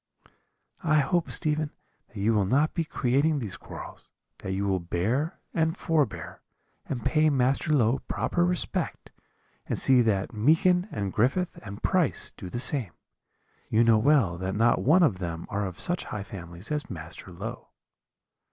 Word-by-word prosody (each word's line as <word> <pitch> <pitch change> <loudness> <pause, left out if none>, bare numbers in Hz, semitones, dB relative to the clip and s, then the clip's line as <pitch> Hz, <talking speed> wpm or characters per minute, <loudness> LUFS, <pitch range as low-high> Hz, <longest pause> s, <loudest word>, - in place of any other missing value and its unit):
"'I 155 -2 +4
hope, 175 +4 0
Stephen, 155 0 0 0.4
that 115 - -14
you 110 +3 +2
will 100 -3 +2
not 145 +8 +2
be 170 - 0
creating 145 +2 +1
these 110 -9 -4
quarrels; - - -10 0.3
that 95 - -5
you 95 +1 -1
will 95 -2 +1
bear 110 - -1
and 160 +2 +1
forbear, 150 - -1 0.5
and 120 -5 -4
pay 155 0 +4
Master 135 +3 +1
Low 130 -3 +3
proper 175 - 0
respect, 180 0 -2 0.6
and - - -1
see 130 -2 +5
that 110 0 0
Meekin 165 - +3
and 100 - -3
Griffith 135 +11 +1
and 100 0 -9
Price 180 -6 +1
do 95 - -8
the 120 - -4
same: 125 - 0 0.8
you 110 +2 +4
know 115 -2 +5
well 115 - +3
that 95 +1 -2
not 115 +2 +3
one 170 +7 +5
of 110 - +2
them 85 -2 -4
are 100 -1 -1
of 90 - -8
such 175 0 -2
high 105 - -5
families 90 - -7
as 150 -1 -2
Master 85 +1 -8
Low.' 110 +7 -7
120 Hz, 160 wpm, -27 LUFS, 100-155 Hz, 0.8 s, see